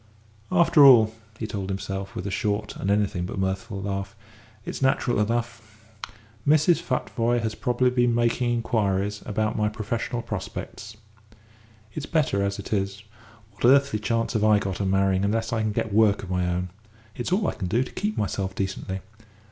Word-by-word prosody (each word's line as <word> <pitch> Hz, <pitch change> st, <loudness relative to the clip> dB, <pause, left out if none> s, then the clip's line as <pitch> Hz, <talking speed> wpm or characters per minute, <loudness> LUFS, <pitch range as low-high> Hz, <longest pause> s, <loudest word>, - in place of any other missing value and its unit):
"After 170 Hz, -4 st, +5 dB
all," 115 Hz, -5 st, +8 dB, 0.2 s
he 110 Hz, -, -4 dB
told 100 Hz, -3 st, -4 dB
himself, 95 Hz, 0 st, -4 dB
with 90 Hz, -, -5 dB
a 100 Hz, -, -3 dB
short 105 Hz, +1 st, -2 dB
and 95 Hz, -, -3 dB
anything 100 Hz, -3 st, +1 dB
but -, -, -6 dB
mirthful 95 Hz, +1 st, -2 dB
laugh, 100 Hz, +1 st, -4 dB, 0.5 s
"it's -, -, -5 dB
natural 130 Hz, -3 st, +2 dB
enough. 115 Hz, -1 st, -2 dB, 0.7 s
Mrs. 155 Hz, +3 st, +4 dB
Futvoye 120 Hz, -2 st, 0 dB
has 110 Hz, -1 st, -1 dB
probably 125 Hz, +1 st, +1 dB
been 120 Hz, -1 st, +2 dB
making 120 Hz, +1 st, +1 dB
inquiries 105 Hz, -4 st, 0 dB
about 110 Hz, +1 st, -1 dB
my 105 Hz, 0 st, +1 dB
professional 115 Hz, +3 st, -3 dB
prospects. 110 Hz, 0 st, -6 dB, 1.0 s
It's 150 Hz, -, -5 dB
better 150 Hz, -, +1 dB
as 100 Hz, 0 st, -1 dB
it -, -, -5 dB
is. 100 Hz, +1 st, -2 dB, 0.5 s
What 105 Hz, -, -3 dB
earthly 135 Hz, -3 st, +4 dB
chance 115 Hz, +2 st, -1 dB
have 110 Hz, -2 st, 0 dB
I 110 Hz, -1 st, +5 dB
got 100 Hz, -2 st, -3 dB
of 100 Hz, -, 0 dB
marrying 95 Hz, 0 st, +2 dB
unless 110 Hz, +3 st, 0 dB
I 115 Hz, -, 0 dB
can 110 Hz, -1 st, 0 dB
get 105 Hz, 0 st, -2 dB
work 105 Hz, -2 st, +4 dB
of 95 Hz, -, -7 dB
my 90 Hz, -1 st, 0 dB
own? 90 Hz, +1 st, -2 dB, 0.5 s
It's 120 Hz, -, -4 dB
all 195 Hz, 0 st, +2 dB
I -, -, 0 dB
can 90 Hz, -, -4 dB
do 115 Hz, +8 st, +1 dB
to -, -, -10 dB
keep 210 Hz, +2 st, -3 dB
myself 95 Hz, -2 st, -2 dB
decently. 95 Hz, -1 st, -3 dB
110 Hz, 175 wpm, -25 LUFS, 100-120 Hz, 1.0 s, all